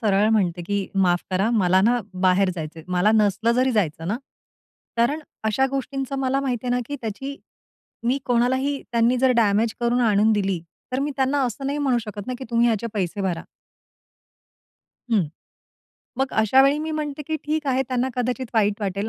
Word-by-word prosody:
सरळ 205 Hz, -1 st, +3 dB
म्हणते, 180 Hz, -5 st, +1 dB
की 200 Hz, +2 st, -2 dB
"माफ 180 Hz, -2 st, +2 dB
करा, 190 Hz, +4 st, +1 dB
मला 190 Hz, -5 st, +3 dB
ना 240 Hz, +5 st, +3 dB, 0.2 s
बाहेर 185 Hz, +1 st, +4 dB
जायचं 160 Hz, -1 st, -6 dB
आहे." 160 Hz, -, -11 dB
मला 180 Hz, +4 st, +3 dB
नसलं 215 Hz, +1 st, +2 dB
जरी 255 Hz, +1 st, +2 dB
जायचं 165 Hz, -6 st, -1 dB
ना. 215 Hz, -, 0 dB, 0.8 s
कारण 280 Hz, +7 st, +2 dB, 0.2 s
अशा 220 Hz, +5 st, +2 dB
गोष्टींचं 275 Hz, 0 st, -3 dB
मला 270 Hz, 0 st, +1 dB
माहिती 255 Hz, -3 st, -2 dB
आहे 245 Hz, -, 0 dB
ना, 250 Hz, -, +1 dB
की 285 Hz, -, -4 dB
त्याची 270 Hz, +6 st, -5 dB, 0.7 s
मी 255 Hz, +3 st, +2 dB
कोणालाही 260 Hz, +3 st, +1 dB
त्यांनी 235 Hz, +1 st, +3 dB
जर 260 Hz, +1 st, +4 dB
डॅमेज 220 Hz, 0 st, +2 dB
करून 240 Hz, +1 st, +2 dB
आणून 215 Hz, -1 st, +4 dB
दिली, 195 Hz, -4 st, 0 dB, 0.3 s
तर 255 Hz, -, 0 dB
मी 290 Hz, +1 st, -1 dB
त्यांना 270 Hz, +1 st, +1 dB
असं 255 Hz, +3 st, -4 dB
नाही 285 Hz, +2 st, -1 dB
म्हणू 265 Hz, -4 st, +2 dB
शकत 210 Hz, -3 st, -7 dB
ना, 255 Hz, -, -3 dB
की 260 Hz, -, -6 dB
"तुम्ही 235 Hz, 0 st, +3 dB
याचे 230 Hz, 0 st, 0 dB
पैसे 200 Hz, 0 st, -2 dB
भरा." 180 Hz, -4 st, -1 dB, 1.7 s
हं. 210 Hz, -5 st, +4 dB, 1.0 s
मग 265 Hz, 0 st, 0 dB
अशावेळी 265 Hz, +6 st, +4 dB
मी 315 Hz, +1 st, -3 dB
म्हणते, 300 Hz, -1 st, -3 dB
की 315 Hz, -1 st, -1 dB
"ठीक 305 Hz, 0 st, -1 dB
आहे, 265 Hz, -1 st, +2 dB
त्यांना 255 Hz, 0 st, 0 dB
कदाचित 250 Hz, +1 st, -1 dB
वाईट 210 Hz, -1 st, +2 dB
वाटेल." 200 Hz, +1 st, -2 dB
235 Hz, 180 wpm, -23 LUFS, 200-265 Hz, 1.7 s, बाहेर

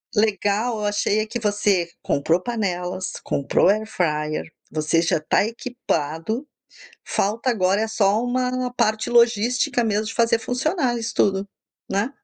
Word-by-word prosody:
legal, 215 Hz, +2 st, +1 dB
eu 210 Hz, -, -2 dB
achei 205 Hz, +1 st, +1 dB
é 215 Hz, -, 0 dB
que 225 Hz, +2 st, -4 dB
você 205 Hz, -5 st, +1 dB
comprou 165 Hz, +5 st, +1 dB
panelas, 185 Hz, -5 st, -2 dB
comprou 140 Hz, -, +1 dB
airfryer, 160 Hz, -8 st, 0 dB, 0.3 s
você 155 Hz, +2 st, +1 dB
já 165 Hz, -, +2 dB
está 155 Hz, +6 st, +1 dB
equipado, 225 Hz, -, -3 dB, 0.6 s
falta 225 Hz, +6 st, 0 dB
agora, 195 Hz, -2 st, +2 dB
eh, 220 Hz, -, -1 dB
só 210 Hz, +1 st, +2 dB
uma 250 Hz, 0 st, -1 dB
parte 215 Hz, -2 st, +1 dB
logística 240 Hz, +1 st, +3 dB
mesmo 215 Hz, 0 st, 0 dB
de 225 Hz, -, -5 dB
fazer 230 Hz, -1 st, +3 dB
funcionar 255 Hz, +1 st, 0 dB
isso 230 Hz, +1 st, -4 dB
tudo, 195 Hz, 0 st, +2 dB, 0.4 s
né. 200 Hz, +7 st, 0 dB
215 Hz, 135 wpm, -23 LUFS, 185-235 Hz, 0.6 s, logística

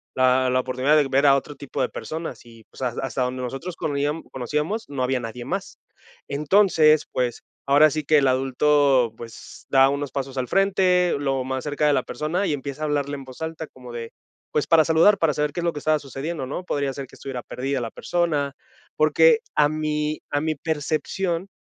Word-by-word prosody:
la 130 Hz, 0 st, +3 dB
la 130 Hz, -, +2 dB
oportunidad 130 Hz, +3 st, +1 dB
de 150 Hz, -2 st, +4 dB
ver 135 Hz, +2 st, +2 dB
a 140 Hz, -1 st, +7 dB
otro 145 Hz, +2 st, -3 dB
tipo 135 Hz, -1 st, -5 dB
de 125 Hz, -, +1 dB
personas, 160 Hz, -4 st, -6 dB
y 115 Hz, -1 st, -16 dB
pues, -, -, -9 dB
has 120 Hz, -2 st, -2 dB
hasta 135 Hz, -1 st, -2 dB
donde 125 Hz, +1 st, -3 dB
nosotros 135 Hz, +8 st, -5 dB
conojian 145 Hz, +1 st, -2 dB
conocíamos, 150 Hz, -, -2 dB
no 140 Hz, -2 st, -4 dB
había 130 Hz, 0 st, +1 dB
nadie 120 Hz, +1 st, -6 dB
más. -, -, -5 dB, 0.5 s
Entonces, 155 Hz, 0 st, +3 dB
pues, 125 Hz, -2 st, -1 dB, 0.2 s
ahora 145 Hz, +3 st, +6 dB
sí 155 Hz, +1 st, -3 dB
que 150 Hz, +1 st, +4 dB
el 135 Hz, -, +2 dB
adulto, 130 Hz, -1 st, +3 dB
pues, 115 Hz, -1 st, -11 dB
da 135 Hz, 0 st, +5 dB
unos 140 Hz, 0 st, -3 dB
pasos 135 Hz, -1 st, -4 dB
al 125 Hz, -, -1 dB
frente, 185 Hz, -1 st, +3 dB
lo 135 Hz, -2 st, -1 dB
más 130 Hz, 0 st, -3 dB
cerca 150 Hz, 0 st, 0 dB
de 145 Hz, -, +4 dB
la -, -, +1 dB
persona, 170 Hz, +6 st, -2 dB
y 155 Hz, -, 0 dB
empieza 140 Hz, +1 st, -5 dB
a -, -, +1 dB
hablarle 145 Hz, -1 st, -1 dB
en 140 Hz, -, -8 dB
voz 130 Hz, +3 st, -13 dB
alta, 160 Hz, 0 st, -4 dB
como 125 Hz, -1 st, -13 dB
de, 115 Hz, -1 st, -6 dB, 0.4 s
pues 150 Hz, -, 0 dB
para 160 Hz, -2 st, +5 dB
saludar, 165 Hz, +6 st, +5 dB
para 165 Hz, -3 st, +2 dB
saber 150 Hz, 0 st, -1 dB
qué 175 Hz, -, -3 dB
es -, -, -5 dB
lo 170 Hz, -1 st, 0 dB
que 150 Hz, -, -5 dB
estaba 155 Hz, +1 st, +2 dB
sucediendo, 140 Hz, +2 st, -5 dB
¿no?, 145 Hz, +7 st, -5 dB
podría 140 Hz, -5 st, -1 dB
ser 135 Hz, -1 st, -6 dB
que -, -, -17 dB
estuviera 130 Hz, -3 st, -6 dB
perdida 135 Hz, +1 st, -3 dB
la 115 Hz, -, -3 dB
persona, 155 Hz, -5 st, -1 dB, 0.4 s
porque 480 Hz, -2 st, +5 dB, 0.2 s
a 145 Hz, -, +4 dB
mi 155 Hz, 0 st, -2 dB
a 145 Hz, -, 0 dB
mi 160 Hz, +1 st, 0 dB
percepción, 165 Hz, +4 st, -2 dB
145 Hz, 210 wpm, -23 LUFS, 130-155 Hz, 0.5 s, a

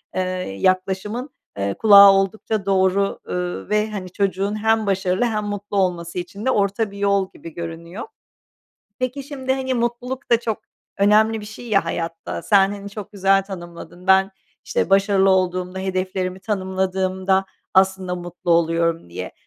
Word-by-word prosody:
eee, 185 Hz, -, +1 dB, 0.4 s
yaklaşımın, 190 Hz, +7 st, 0 dB, 0.3 s
eee, 100 Hz, 0 st, -1 dB
kulağa 200 Hz, -2 st, +8 dB
oldukça 195 Hz, +1 st, -1 dB
doğru, 195 Hz, 0 st, +2 dB
ııı, 180 Hz, +2 st, -3 dB
ve, 210 Hz, +1 st, +1 dB
hani, 190 Hz, -3 st, -5 dB
çocuğun 200 Hz, +2 st, -1 dB
hem 220 Hz, -1 st, +3 dB
başarılı 190 Hz, +2 st, +1 dB
hem 215 Hz, -3 st, -1 dB
mutlu 205 Hz, 0 st, -4 dB
olması 180 Hz, -2 st, -1 dB
için 190 Hz, +5 st, -7 dB
de 260 Hz, -, +3 dB
orta 200 Hz, 0 st, 0 dB
bir 200 Hz, -, -10 dB
yol 200 Hz, -1 st, +1 dB
gibi 165 Hz, -, -11 dB
görünüyor. 170 Hz, +4 st, -7 dB, 1.0 s
Peki, 255 Hz, +2 st, -2 dB
şimdi, 265 Hz, -2 st, -3 dB
hani, 260 Hz, -1 st, -1 dB
mutluluk 240 Hz, +2 st, -3 dB
da 235 Hz, -1 st, +4 dB
çok 225 Hz, -3 st, -2 dB, 0.4 s
önemli 215 Hz, +2 st, +4 dB
bir 210 Hz, -, -9 dB
şey 230 Hz, +3 st, -10 dB
ya 200 Hz, -2 st, +3 dB
hayatta, 165 Hz, 0 st, -4 dB
sen, 195 Hz, -2 st, +4 dB
hani, 200 Hz, 0 st, -8 dB
çok 210 Hz, 0 st, -8 dB
güzel 195 Hz, 0 st, +3 dB
tanımladın, 175 Hz, -1 st, -10 dB
ben, 190 Hz, 0 st, +5 dB, 0.3 s
işte, -, -, -1 dB
"Başarılı 195 Hz, 0 st, +4 dB
olduğumda, 185 Hz, 0 st, 0 dB
hedeflerimi 185 Hz, 0 st, -2 dB
tanımladığımda 190 Hz, -1 st, 0 dB, 0.3 s
aslında 190 Hz, -1 st, +2 dB
mutlu 175 Hz, 0 st, -5 dB
oluyorum." 165 Hz, -, +1 dB
diye. 90 Hz, +1 st, -6 dB
195 Hz, 150 wpm, -21 LUFS, 185-210 Hz, 1.0 s, kulağa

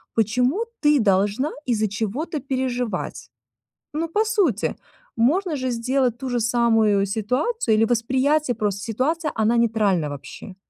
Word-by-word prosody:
Почему 250 Hz, -, +1 dB, 0.2 s
ты 295 Hz, -2 st, +5 dB
должна 205 Hz, +8 st, +1 dB, 0.2 s
из-за 215 Hz, -2 st, +2 dB
чего-то 235 Hz, -, -3 dB
переживать? 250 Hz, -, -3 dB, 0.6 s
Ну, 325 Hz, +2 st, -1 dB
по 415 Hz, +7 st, +1 dB
сути, 390 Hz, -, +1 dB, 0.4 s
можно 315 Hz, +8 st, +2 dB
же 260 Hz, -2 st, -2 dB
сделать 245 Hz, +1 st, 0 dB
ту 260 Hz, +1 st, -5 dB
же 245 Hz, -1 st, 0 dB
самую 225 Hz, -3 st, +3 dB
ситуацию, 235 Hz, -, 0 dB
или 225 Hz, -, +4 dB
восприятие 255 Hz, +4 st, +1 dB
просто 205 Hz, -3 st, -2 dB
ситуации- 290 Hz, +9 st, -1 dB
она 225 Hz, +1 st, +2 dB
нейтральна 210 Hz, -9 st, +1 dB
вообще. 145 Hz, +6 st, -9 dB
240 Hz, 130 wpm, -23 LUFS, 215-285 Hz, 0.6 s, ты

